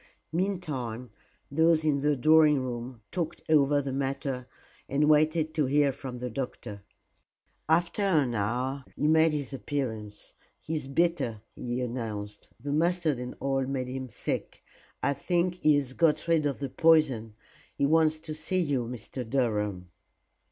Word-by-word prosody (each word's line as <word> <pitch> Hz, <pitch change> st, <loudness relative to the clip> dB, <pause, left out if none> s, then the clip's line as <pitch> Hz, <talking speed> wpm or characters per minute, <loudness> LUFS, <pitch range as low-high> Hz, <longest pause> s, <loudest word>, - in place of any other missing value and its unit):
Meantime, 145 Hz, -, -2 dB, 0.4 s
those 160 Hz, +1 st, +3 dB
in 145 Hz, -3 st, +2 dB
the 150 Hz, 0 st, +2 dB
drawing 155 Hz, +2 st, +5 dB
room 120 Hz, -2 st, -5 dB
talked 170 Hz, -4 st, -3 dB
over 145 Hz, -2 st, +4 dB
the 135 Hz, -1 st, -3 dB
matter 135 Hz, -1 st, -2 dB, 0.4 s
and 145 Hz, +2 st, +2 dB
waited 155 Hz, +1 st, +3 dB
to 150 Hz, -4 st, +1 dB
hear 145 Hz, +1 st, +3 dB
from 130 Hz, -1 st, -7 dB
the 125 Hz, +1 st, -4 dB
doctor. 110 Hz, -5 st, -5 dB, 0.9 s
After 170 Hz, +5 st, +2 dB
an 155 Hz, -11 st, +2 dB
hour 125 Hz, +6 st, -1 dB
he 150 Hz, -, -1 dB
made 160 Hz, +1 st, +5 dB
his 145 Hz, -2 st, -3 dB
appearance. 110 Hz, -7 st, -4 dB, 0.3 s
"He 160 Hz, -, -6 dB
is 150 Hz, -4 st, -3 dB
better," 135 Hz, -8 st, 0 dB
he 120 Hz, +1 st, -3 dB
announced; 110 Hz, -4 st, -5 dB
"the 140 Hz, +4 st, -3 dB
mustard 165 Hz, -3 st, +1 dB
and 125 Hz, 0 st, -6 dB
oil 135 Hz, -1 st, 0 dB
made 130 Hz, -2 st, -2 dB
him 130 Hz, 0 st, -5 dB
sick. -, -, -4 dB, 0.4 s
I 140 Hz, -, +3 dB
think 175 Hz, +5 st, 0 dB
he 155 Hz, -1 st, +5 dB
has 135 Hz, -3 st, -1 dB
got 155 Hz, +1 st, +2 dB
rid 160 Hz, -3 st, +3 dB
of 140 Hz, -, -2 dB
the 140 Hz, -1 st, -4 dB
poison. 135 Hz, -9 st, +3 dB, 0.4 s
He 140 Hz, -, +1 dB
wants 160 Hz, +1 st, +3 dB
to 155 Hz, -, -6 dB
see 185 Hz, +4 st, -2 dB
you, 140 Hz, -8 st, 0 dB
Mr. 125 Hz, +2 st, -6 dB
Durham." 105 Hz, -8 st, -1 dB
140 Hz, 150 wpm, -28 LUFS, 125-155 Hz, 0.9 s, drawing